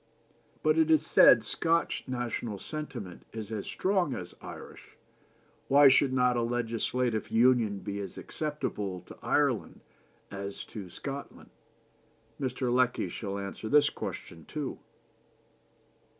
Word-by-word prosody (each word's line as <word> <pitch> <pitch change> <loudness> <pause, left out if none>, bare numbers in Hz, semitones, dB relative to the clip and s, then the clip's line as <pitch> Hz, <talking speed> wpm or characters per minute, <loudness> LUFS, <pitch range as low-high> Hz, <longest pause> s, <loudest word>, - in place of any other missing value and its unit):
But, 155 +1 +3
it 160 0 +4
is 155 -1 +4
said, 120 -6 +7
Scotch 165 +9 0
national 120 -4 -3
sentiment 120 - -6
is 110 -1 -6
as 105 -3 -4
strong 185 -8 +1
as 90 -1 -7
Irish, - - -11 0.7
why 140 0 +8
should 135 0 +4
not 125 -1 +3
a 120 - +1
legislative 115 0 -1
union 115 -3 +3
be 100 0 -5
as 100 - -6
acceptable 105 - -4
to - - -13
Ireland - - 0 0.5
as 100 0 -6
to 100 -4 -6
Scotland? 140 +9 -7 0.9
Mr. 130 -2 -1
Lecky 125 0 +2
shall 100 -2 -4
answer 100 +2 -5
this 145 +1 +5
question 80 -2 -7
too. 150 -4 -5
120 Hz, 120 wpm, -30 LUFS, 105-140 Hz, 0.9 s, why